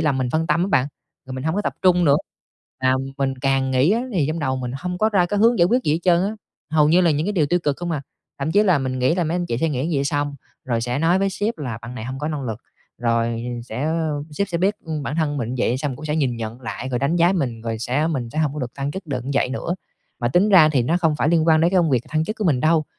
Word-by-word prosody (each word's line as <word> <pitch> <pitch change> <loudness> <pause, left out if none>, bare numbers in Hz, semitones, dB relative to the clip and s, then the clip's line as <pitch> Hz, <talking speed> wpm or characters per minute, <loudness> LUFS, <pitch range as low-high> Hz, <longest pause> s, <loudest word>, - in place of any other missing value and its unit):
làm 150 -4 +1
mình 130 -2 -1
phân 160 +4 0
tâm 165 +1 +2
á 190 - 0
bạn, 130 -9 +2 0.4
rồi 130 - -7
mình 130 +1 -5
hông 160 +1 0
có 205 - 0
tập - - -1
trung 180 -1 +4
nữa, 140 -2 +5 0.6
à, 130 0 +2 0.2
mình 135 -1 0
càng 135 0 +1
nghĩ 130 +5 +3
á 230 +2 +1
thì 165 -8 +1
trong 155 +2 -2
đầu 130 -4 -1
mình 125 -1 -4
hông 180 +3 -4
có 215 - +3
ra 195 -5 +2
cái 205 +3 -1
hướng 230 +3 +4
giải 170 - +5
quyết 245 +7 +2
gì 150 - +2
hết 160 - +1
trơn 175 -1 +4
á, 200 - 0 0.4
hầu 150 -1 +4
như 170 +4 +5
là 175 -2 +4
những 150 +2 0
cái 205 - 0
điều 165 -7 +2
tiêu 175 +4 +2
cực 145 -3 0
không 175 0 -4
à. 150 -4 -2 0.4
Thậm 140 +3 -2
chí 205 - +5
là 185 -7 +3
mình 130 -1 -2
nghĩ 130 +5 +2
là 180 -1 0
mấy 160 +2 -1
anh 175 -1 -2
chị 115 - -2
sẽ 165 - +1
nghĩ 140 -1 -1
như 165 - 0
vậy 140 - 0
xong, 145 0 -1 0.3
rồi 120 -3 -1
sẽ 120 +2 -2
nói 165 +4 +3
với 195 0 +1
sếp 205 +3 -2
là 125 -6 -4
bạn 120 +2 -8
này 110 -3 -6
hông 130 +2 -5
có 150 +2 -2
năng 150 -3 -3
lực, 115 -3 -4 0.4
rồi 115 -1 0 0.2
sẽ 120 +2 -5
ơ, 155 -2 -1
sếp 200 +6 -2
sẽ 170 -3 -2
biết, 195 +4 +2
ưm, 155 -2 -4
bản 145 +2 -3
thân 155 -3 0
mình 120 -2 -3
vậy 120 +1 +1
xong 140 -2 -3
cũng - - -10
sẽ 150 0 -1
nhìn 130 -6 0
nhận 115 +2 -6
lại 125 +1 -5
rồi 125 -2 -1
đánh 140 +6 +1
giá 175 +2 +4
mình, 125 -11 -2
rồi 115 -1 -3
sẽ 130 +7 0
mình 130 -8 -2
sẽ 155 - -5
hông 150 -3 +1
có 150 - -4
được 125 -2 -5
thăng 140 0 -3
chức 190 +4 -7
được 130 -5 -3
vậy 135 - +2
nữa. 135 +6 -3 0.5
Mà 120 - +1
tính 180 - +3
ra 180 -7 +7
thì 140 -5 +2
nó 160 +9 +1
không 160 -4 +1
phải 150 - +1
liên 165 -1 +3
quan 160 -1 +5
đến 170 +2 +3
cái 190 - +3
công 165 -3 +2
việc 125 -2 +1
thăng 155 +1 0
chức 215 +6 -4
của 215 - -3
mình 145 -8 +2
đâu, 155 +2 +3
150 Hz, 315 wpm, -22 LUFS, 130-170 Hz, 0.6 s, ra